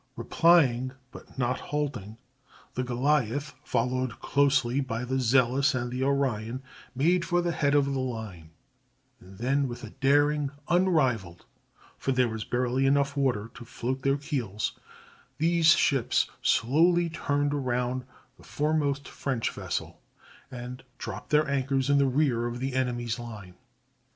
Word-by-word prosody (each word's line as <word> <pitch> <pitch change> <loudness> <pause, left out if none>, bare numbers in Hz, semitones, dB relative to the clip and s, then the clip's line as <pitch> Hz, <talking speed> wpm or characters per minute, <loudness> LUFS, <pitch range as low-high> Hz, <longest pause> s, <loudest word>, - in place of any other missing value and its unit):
Replying, 130 -7 +3 0.2
but - - -14
not 125 -1 0
halting, 130 -8 -4 0.6
the 125 - -2
Goliath, 140 +2 0
followed 125 -3 -1
closely 140 -3 +2
by 125 -3 -3
the 130 +1 -1
Zealous 130 +3 +3
and 120 -1 -3
Orion, 130 -2 -1 0.3
made 170 +7 +2
for 175 0 +1
the 175 0 0
head 145 -3 +1
of 145 -1 +4
the 140 -1 -2
line, 110 -10 -5 0.7
and 95 0 -15
then 135 +5 +1
with 120 -1 -7
a 110 - -8
daring 145 +1 +2 0.2
unrivaled, 135 - +1 0.5
for 135 - -1
there 125 -1 +3
was 110 -1 -4
barely 125 +3 0
enough 140 0 +2
water 125 -6 0
to 125 - -10
float 130 +3 -4
their 135 +1 +2
keels, 125 - -3 0.7
these 165 +1 +2
ships 140 -5 +3
slowly 170 +8 +3
turned 145 -3 -1
around 125 -2 -1 0.3
the - - -18
foremost 145 -2 -1
French 130 -5 -2
vessel - - -5 0.5
and 125 +1 -7 0.2
dropped - - -7
their 150 0 +3
anchors 135 0 0
in 140 - +4
the 140 - +4
rear 130 -3 +1
of 120 0 -5
the 135 +1 -3
enemy's 120 -2 -1
line. 105 -6 -9
130 Hz, 140 wpm, -27 LUFS, 120-145 Hz, 0.7 s, of